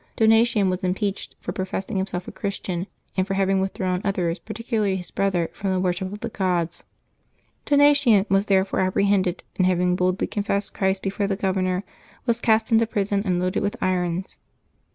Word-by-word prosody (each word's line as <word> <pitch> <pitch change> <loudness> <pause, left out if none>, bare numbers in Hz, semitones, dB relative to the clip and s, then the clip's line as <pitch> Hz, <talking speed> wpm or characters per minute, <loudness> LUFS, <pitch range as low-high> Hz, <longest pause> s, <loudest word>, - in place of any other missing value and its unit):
Donatian 225 -2 +4
was 185 0 -1
im 180 0 +1
peached 200 -1 -3
for - - -5
professing 190 +2 -3
himself 190 -1 -3
a - - -6
Christian, 190 -3 -4 0.3
and 185 0 +1
for 195 - -1
having 195 0 +2
withdrawn 185 -1 -1
others, 180 -4 -1
particularly 220 -3 -2
his 180 -2 -6
brother, 185 -4 0
from 195 -1 -2
the 185 - +1
wor 185 -1 +1
ship 185 +1 -5
of 205 - -8
the 235 - -3
gods. 175 -5 -1 0.8
Donatian 285 -8 +5
was 195 +1 +2
therefore 195 -1 +2
apprehended, 190 -1 +1
and 185 - +3
having 180 0 +2
boldly 185 +1 +1
confessed 200 -1 -2
Christ 190 0 0
before 195 +1 -1
the 195 - 0
governor, 185 -1 0 0.4
was 235 -1 +1
cast 220 0 +2
into 225 0 +4
prison 200 -2 0
and 180 -2 +1
loaded 185 0 0
with 205 0 -1
irons. 180 0 -1
195 Hz, 175 wpm, -24 LUFS, 185-205 Hz, 0.8 s, Donatian